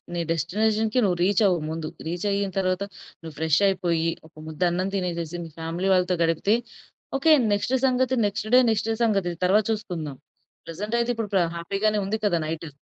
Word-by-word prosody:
నీ 170 - -1
డెస్టినేషన్‌కి 215 - +1
నువ్వు 180 -4 +1
రీచ్ 200 +3 +2
అవ్వు 180 -3 +2
ముందు. 160 0 -4 0.2
రీచ్ 175 +3 -3
అయిన 200 0 0
తరువాత 185 0 0 0.4
నువ్వు 165 -2 -9
ఫ్రెష్ 160 -1 +2
అయిపోయి 170 -4 0 0.2
ఒక 160 - -27
ముద్ద 160 +2 -9
అన్నం 185 +2 -1
తినేసేసి 175 -3 -3
మీ - - -9
ఫ్యామిలీ 165 +3 -3
వాళ్ళతో 180 0 +2
గడిపితే 165 +6 +2 0.6
ఒకే 315 +4 +3 0.2
నెక్స్ట్ 205 +5 -1
సంగతి 260 0 +2
నెక్స్ట్ 210 +1 -2
డే, - - +9
నెక్స్ట్ 220 0 -1
సంగతి 195 -6 +1
తరువాత 205 +3 +3
చూసుకుందాం. 170 -10 -4 0.5
ప్రెజెంట్ 205 +7 -4
అయితే 235 0 0
ఇప్పుడు 225 -2 -3
ప్ర 190 - +4
హ్యాపీ 170 +4 -4
గానే 215 -1 +3
ఉంది 215 +3 -2
గదా! 175 -5 +2
నైటు. 160 0 -4
185 Hz, 180 wpm, -25 LUFS, 165-210 Hz, 0.6 s, డే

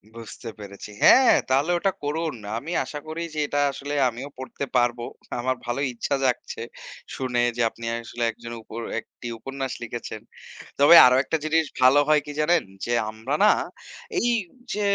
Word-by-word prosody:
বুঝতে 115 +1 -9
পেরেছি। 100 0 -9
হ্যাঁ, 260 -1 +7
তাহলে 140 +6 +2
ওটা 195 +3 +1
করুন। 155 0 -2 0.2
আমি 145 +8 -6
আশা 150 - -7
করি 160 +2 -5
যে - - -2
এটা 145 - -1
আসলে 140 +1 -6 0.2
আমিও 125 +4 -7
পড়তে 130 +2 -5
পারবো। 120 -1 +2 0.4
আমার 130 +1 0
ভালো 120 +3 -2
ইচ্ছা 120 +4 -1
জাগছে 125 -2 -1 0.5
শুনে 125 -2 -1 0.2
যে - - 0
আপনি 115 +1 -10 0.2
আসলে 120 +1 -5
একজন 115 +1 -10
উপর 110 +1 -8 0.2
একটি 120 - -11
উপন্যাস 135 +2 -5
লিখেছেন। 115 -2 -6 0.6
তবে 145 +4 +8
আরো 125 0 +6
একটা 160 - -1
জিনিস 160 +1 +2 0.2
ভালো 130 +3 +6
হয় 155 -1 +4
কি 150 - -6
জানেন? 165 +1 +3 0.2
যে 120 - -3 0.2
আমরা 110 +6 -5
না 210 - +7 0.7
এই 240 - +1 0.4
যে, 210 - -2
130 Hz, 165 wpm, -24 LUFS, 120-150 Hz, 0.7 s, তবে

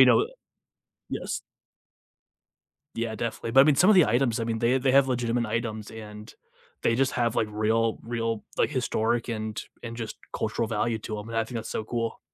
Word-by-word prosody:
you - - +8
know, 415 - +5 0.8
yes. - - -3 1.5
Yeah, 115 -1 -2
definitely, 115 +1 -3
but 135 +3 +7
I 135 - +8
mean 150 - +5
some 185 +8 +6
of - - +7
the 180 - +7
items, 120 0 +2
I - - 0
mean, 115 0 -1
they 120 +3 +3
they 130 0 +2
have 140 0 +6
legitimate 120 -1 0
items 110 -1 -3
and 105 -1 -9 0.5
they 115 - +3
just 130 +2 +2
have 120 -2 0
like 110 - +2
real 110 +1 +1
real, 115 -2 -2
like - - +2
historic 120 -3 0
and 110 -1 -3 0.2
and 115 -1 -6
just 115 -2 -5 0.2
cultural 110 +1 -1
value 115 +1 0
to 105 0 -5
'em, 105 +2 -7
and 115 - -5
I 115 - +2
think 120 +2 -7
that's 115 -1 -4
so 110 - -3
cool. 115 0 -3
115 Hz, 200 wpm, -27 LUFS, 110-120 Hz, 1.5 s, you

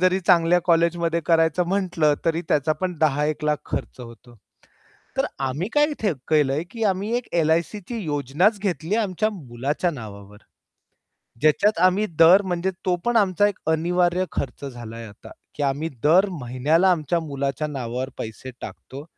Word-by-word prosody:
जरी 185 +1 +3
चांगल्या 175 0 +4
कॉलेजमध्ये 170 -1 +2
करायचं 165 +1 +2
म्हटलं, 175 -6 +1
तरी 165 0 +1
त्याचा 150 +1 +2
पण 180 +4 -3
10 150 -2 +2
एक 155 0 -3
लाख 150 0 +2
खर्च - - -4
होतो. 120 0 -13 0.8
तर - - +2
आम्ही 135 +7 -2
काय 295 0 +5 0.2
थ 220 - +1 0.2
केलंय, 150 0 +2
की 230 -1 -4
आम्ही 200 +1 0
एक 245 - -6
एल-आय-सीची 170 +7 0
योजनाच 150 - +1
घेतली 190 -2 -2
आहे, 230 - +2
आमच्या 205 +2 -1
मुलाच्या 145 - -3
नावावर. 105 -6 -10 1.0
ज्याच्यात 165 +7 +3
आम्ही 185 +3 +4
दर 175 +4 +8
म्हणजे 185 -1 -2
तो 180 -1 +2
पण 240 0 +1
आमचा 205 -1 +3
एक 205 - -5
अनिवार्य 175 +3 +1
खर्च 140 +1 -4
झालाय 115 -3 -8
आता, 105 0 -14 0.2
की 145 - -2
आम्ही 140 +4 -1
दर 180 +7 +5
महिन्याला 145 +10 +2
आमच्या 170 0 0
मुलाच्या 140 -1 -3
नावावर 130 -2 -4
पैसे 115 +4 -7
टाकतो. 135 +2 -9
165 Hz, 155 wpm, -23 LUFS, 140-185 Hz, 1.0 s, दर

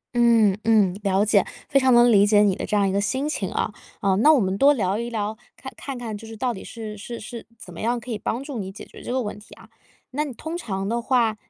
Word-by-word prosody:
嗯 230 -5 +4
嗯， 215 -5 +4
了 200 0 +2
解。 205 -3 +4 0.2
非 275 - +3
常 260 -1 +3
能 240 0 +6
理 205 -1 +5
解 205 -1 +5
你 195 -3 +3
的 - - -5
这 210 - +1
样 200 -1 +3
一 - - 0
个 200 +1 +1
心 265 +7 -1
情 200 -11 -2
啊， 210 - -2 0.3
嗯， 195 +1 +2
那 310 - +7
我 290 - +5
们 190 -2 0
多 280 +1 +7
聊 200 -3 -1
一 235 0 -3
聊， 215 -1 -3 0.2
看 265 - -9
看 275 -2 -6
看 230 -3 -5
就 220 +2 -10
是 225 -1 -9
到 250 0 -1
底 190 - -9
是 220 -2 -7
是 230 +3 -7
是 230 +2 -9
怎 180 -5 -12
么 - - -10
样 235 +2 0
可 240 +2 -9
以 215 - -2
帮 240 +6 -3
助 275 -6 -6
你 190 -1 -5
解 195 - -10
决 - - -14
这 - - -6
个 260 0 0
问 205 0 -6
题 210 - -15
啊。 - - -17 0.4
那 295 +3 -1
你 285 - -5
通 320 +7 -6
常 195 - -4
的 235 +2 -1
话， 235 -3 +2
225 Hz, 295 characters per minute, -23 LUFS, 205-245 Hz, 0.4 s, 那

